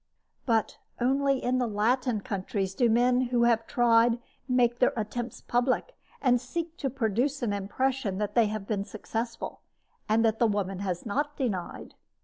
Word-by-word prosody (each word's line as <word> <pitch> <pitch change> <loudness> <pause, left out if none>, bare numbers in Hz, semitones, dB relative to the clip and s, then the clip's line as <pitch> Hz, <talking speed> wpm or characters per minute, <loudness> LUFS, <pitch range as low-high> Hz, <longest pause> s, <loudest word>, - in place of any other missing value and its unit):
But 225 -3 +1 0.2
only 270 +2 +2
in 255 +1 +1
the 245 - +1
Latin 225 +2 +1
countries 195 -3 -3
do 240 +3 +2
men 245 +2 +3
who 240 -1 +2
have 230 -1 +2
tried 235 -1 +4 0.3
make 245 -2 +2
their 250 - +4
attempts 230 +3 -4
public, 255 - 0 0.3
and 245 -3 +4
seek 330 +6 -4
to 275 - -1
produce 250 +3 -1
an 215 -4 0
impression 205 +1 -1
that 210 0 -2
they 230 -3 +4
have 210 -1 -4
been 200 -1 -1
successful, 225 +3 -5 0.5
and 225 +2 +3
that 220 0 +1
the 235 - +4
woman 195 -3 -1
has 185 -3 -3
not 290 +7 -2
denied. 205 -10 -3
235 Hz, 160 wpm, -28 LUFS, 210-255 Hz, 0.5 s, tried